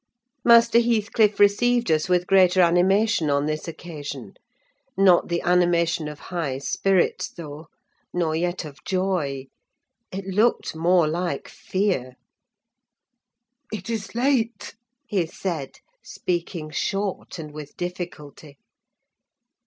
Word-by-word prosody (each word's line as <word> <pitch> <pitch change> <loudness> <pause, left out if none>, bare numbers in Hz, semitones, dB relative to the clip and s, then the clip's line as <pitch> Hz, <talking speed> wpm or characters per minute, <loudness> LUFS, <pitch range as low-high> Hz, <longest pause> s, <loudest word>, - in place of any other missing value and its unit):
Master 235 0 +6
Heathcliff 220 -2 +2
received 235 +3 +3
us 155 +3 +1
with 180 -1 +2
greater 185 -1 +4
animation 180 0 +3
on 140 0 +1
this 155 +2 -3
occasion: 160 -3 -7 0.6
not 190 -3 +5
the 170 0 -2
animation 175 -2 +2
of 150 -1 -7 0.2
high 150 -7 -2
spirits 185 +6 0
though, 155 -1 -10 0.4
nor 165 -3 0
yet 175 +1 -2
of 150 0 -12
joy; 180 -8 -1 0.7
it 195 +1 -5
looked 210 0 +1
more 170 0 +3
like 170 -2 -2
fear. 185 -11 -2 1.6
"It 215 +1 -5
is 210 -2 -5
late!" 245 -2 0 0.3
he 185 -5 -1
said, 160 -5 -5 0.3
speaking 170 -3 -4
short 195 +5 -3
and 155 -2 -7
with 150 -1 -10
difficulty. 160 -5 -7
175 Hz, 110 wpm, -24 LUFS, 155-195 Hz, 1.6 s, Master